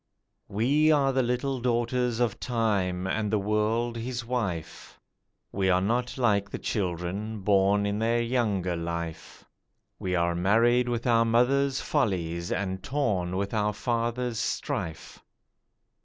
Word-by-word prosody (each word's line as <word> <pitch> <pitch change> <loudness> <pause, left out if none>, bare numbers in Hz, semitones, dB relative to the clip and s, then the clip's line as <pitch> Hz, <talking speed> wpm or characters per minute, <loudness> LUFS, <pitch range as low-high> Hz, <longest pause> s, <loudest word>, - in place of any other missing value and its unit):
WE 140 +10 +3
are 140 -3 +3
the 130 - +2
little 125 +2 -1
daughters 120 0 0
of 120 -4 0
Time 100 -7 0
and 105 +2 -1
the 105 - +2
World 105 +3 0
his 120 +1 -4
wife, 100 -10 -4 0.5
We 95 -1 0
are 90 0 +4
not 120 +7 -1
like 100 -5 +2
the - - -5
children, 100 +3 -3
born 100 +1 +3
in 100 +1 -1
their 115 +1 +2
younger 110 -7 0
life, 85 -1 -5 0.5
We 90 -1 -1
are 85 0 +1
marred 115 +7 +3
with 120 0 -2
our 115 -2 +4
mother's 130 +4 +2
follies 85 - -1
and 95 -1 -2
torn 95 -11 -1
with 100 +2 -2
our 105 -1 +1
father's 120 +1 -1
strife. 80 - -4
110 Hz, 135 wpm, -27 LUFS, 95-120 Hz, 0.5 s, are